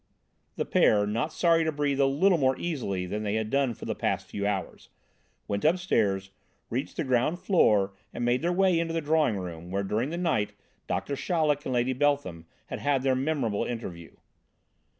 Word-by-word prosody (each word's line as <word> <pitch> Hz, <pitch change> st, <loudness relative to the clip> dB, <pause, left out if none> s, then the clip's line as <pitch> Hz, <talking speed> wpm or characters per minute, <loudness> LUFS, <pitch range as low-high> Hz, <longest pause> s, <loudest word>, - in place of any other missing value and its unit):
The -, -, -2 dB
pair, 105 Hz, -1 st, +4 dB
not 115 Hz, +9 st, -1 dB
sorry 165 Hz, -1 st, +3 dB
to 160 Hz, -, 0 dB
breathe 145 Hz, -2 st, -1 dB
a 135 Hz, -, +5 dB
little 170 Hz, +6 st, +3 dB
more 130 Hz, -1 st, +2 dB
easily 115 Hz, -, -2 dB
than 105 Hz, +4 st, -3 dB
they 105 Hz, 0 st, -1 dB
had 110 Hz, -1 st, -2 dB
done 135 Hz, -4 st, +1 dB
for -, -, -9 dB
the -, -, -1 dB
past -, -, -1 dB
few 100 Hz, 0 st, -3 dB
hours, 100 Hz, -2 st, -4 dB, 0.6 s
went 100 Hz, 0 st, -2 dB
upstairs, 110 Hz, -, +1 dB, 0.4 s
reached 130 Hz, +4 st, -3 dB
the 165 Hz, -, 0 dB
ground 130 Hz, +5 st, +1 dB
floor 105 Hz, -, +3 dB, 0.2 s
and 120 Hz, -, -3 dB
made 120 Hz, +1 st, +2 dB
their 170 Hz, +2 st, +1 dB
way 185 Hz, -2 st, +3 dB
into 165 Hz, 0 st, -2 dB
the -, -, +2 dB
drawing 150 Hz, -7 st, +2 dB
room, 85 Hz, -2 st, -7 dB
where 100 Hz, +2 st, -1 dB
during 110 Hz, +7 st, -1 dB
the 170 Hz, -, -4 dB
night 130 Hz, -13 st, 0 dB, 0.3 s
Doctor 140 Hz, -, -2 dB
Chaleck 150 Hz, -2 st, 0 dB
and 130 Hz, -, -1 dB
Lady 120 Hz, +2 st, +1 dB
Beltham 130 Hz, -, 0 dB, 0.2 s
had -, -, -6 dB
had 140 Hz, -2 st, +1 dB
their 135 Hz, -1 st, +3 dB
memorable 130 Hz, -6 st, 0 dB
interview. 90 Hz, -9 st, -6 dB
130 Hz, 190 wpm, -27 LUFS, 105-155 Hz, 0.6 s, a